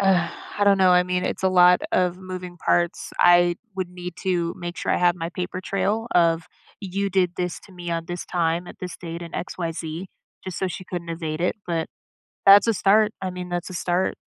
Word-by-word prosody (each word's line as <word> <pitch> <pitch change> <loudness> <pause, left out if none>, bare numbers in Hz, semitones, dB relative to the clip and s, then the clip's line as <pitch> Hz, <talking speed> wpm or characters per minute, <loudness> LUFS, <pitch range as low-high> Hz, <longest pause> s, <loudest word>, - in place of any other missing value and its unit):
I 195 +1 0
don't 200 -1 +5
know, 185 -1 +5
I 180 0 +6
mean, 180 0 -1
it's - - -3
a 190 - +4
lot 180 -1 +6
of 180 -1 +1
moving 185 -1 -7
parts. 175 +1 0
I 175 0 +5 0.2
would 185 -2 -2
need 180 -1 -8
to 175 -3 0
make 175 0 -6
sure - - -1
I - - +2
have 175 -1 +3
my 165 -1 -3
paper 180 +1 -4
trail 205 +4 -1
of 165 -1 +3 0.3
you 200 0 -2
did 180 -2 +2
this 180 -1 -3
to 195 - -17
me 175 -1 -6
on 165 -1 -2
this 175 0 -5
time 170 0 0
at - - -11
this 180 -1 -6
date 170 0 -7
and 170 - -9
x 180 - -4
y 170 -2 -1
z 165 +3 -6 0.4
just 185 -2 -5
so 190 - 0
she 185 - -7
couldn't 175 -1 -6
evade 160 -2 -4
it, 180 - 0
but 165 -2 -1 0.6
that's 200 +2 +8
a 230 - +4
start. 210 +3 +4
I 190 - -2
mean, 180 0 -6
that's 175 +1 -3
a 185 - -8
start 175 +1 0
180 Hz, 220 wpm, -24 LUFS, 175-185 Hz, 0.6 s, that's